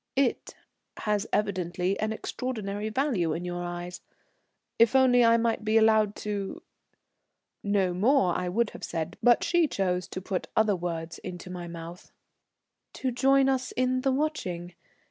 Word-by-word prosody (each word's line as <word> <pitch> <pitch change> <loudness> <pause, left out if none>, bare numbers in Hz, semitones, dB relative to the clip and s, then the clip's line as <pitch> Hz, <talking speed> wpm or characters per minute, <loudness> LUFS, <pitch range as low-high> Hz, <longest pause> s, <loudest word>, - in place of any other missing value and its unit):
"'It' 270 -2 0 0.4
has 210 0 -1
evidently 185 -2 -1
an 215 +1 -1
extraordinary 215 -3 -4
value 220 - 0
in 175 +2 -4
your 175 0 -4
eyes. 175 0 -6 0.8
If 230 +2 +5
only 250 -2 +6
I 230 0 +5
might 230 -1 0
be 215 +1 +3
allowed 220 -2 +4
to 205 -2 -4 0.5
" - - -54
know 185 -2 +2
more, 195 -1 +3
I 180 0 -1
would 225 +4 0
have - - -11
said, 165 0 -3
but 240 -1 +5
she 345 -2 +3
chose 185 -7 -1
to - - -6
put 190 0 -3
other 215 -2 +3
words 170 -2 -4
into 180 0 -8
my 175 -1 -6
mouth. 170 +1 -9 0.8
"To 260 - -2
join 270 +2 +4
us 260 -1 0
in 255 0 +1
the 270 - +1
watching? 190 - -2
210 Hz, 155 wpm, -28 LUFS, 180-245 Hz, 0.8 s, only